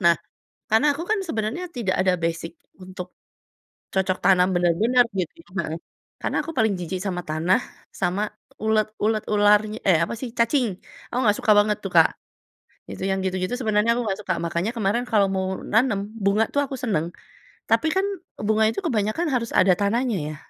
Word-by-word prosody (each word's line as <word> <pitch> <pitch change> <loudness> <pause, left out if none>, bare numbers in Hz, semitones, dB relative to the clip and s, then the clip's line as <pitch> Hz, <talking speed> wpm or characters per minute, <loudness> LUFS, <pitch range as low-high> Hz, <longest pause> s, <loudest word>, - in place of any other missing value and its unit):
Nah, 170 -2 +5 0.5
karena 220 +7 +3
aku 325 - -4
kan 435 0 +1
sebenernya 320 - -3
tidak 230 - -2
ada 185 -1 +2
basic 165 - -3 0.3
untuk 185 -1 -8 0.8
cocok 190 -1 +1
tanam 180 0 +4
bener-bener 185 +8 +3
gitu 190 - -3
kan, - - -19 0.2
heeh. 165 - -4 0.4
Karena - - -2
aku - - -5
paling 220 -8 +2
jijik 180 +1 -4
sama 180 -2 -3
tanah, 165 +6 +1 0.3
sama 195 +3 -1 0.3
ulet 220 0 +2
ulet, 215 0 +1
ular 205 0 +5 0.3
eh, 175 -4 +6
apa - - -6
sih, 255 - -4
cacing. 235 +2 +2 0.4
Aku - - -3
nggak 210 -2 +4
suka 215 - +4
banget 210 0 +4
tuh, - - -1
Kak. - - +7 0.8
Itu - - -7
yang 190 - 0
gitu-gitu 185 +3 -1
sebenarnya 215 -2 +2
aku 240 - -2
nggak 195 -1 -1
suka. 185 -3 -1
Makanya 170 +5 -1
kemarin 215 +2 +1
kalau 205 -3 +4
mau 190 0 -1 0.2
nanem 225 -1 +2 0.3
bunga 200 +3 +3
tuh 285 - 0
aku 275 - -6
seneng, 170 -10 -1 0.6
tapi 320 - +3
kan 380 - +3 0.4
bunga 220 +1 +3
itu 225 - -2
kebanyakan 220 +4 0
harus 235 -3 -1
ada 185 - +6
tanahnya 230 +3 +1
ya? 155 - -6
210 Hz, 175 wpm, -24 LUFS, 185-230 Hz, 0.8 s, Kak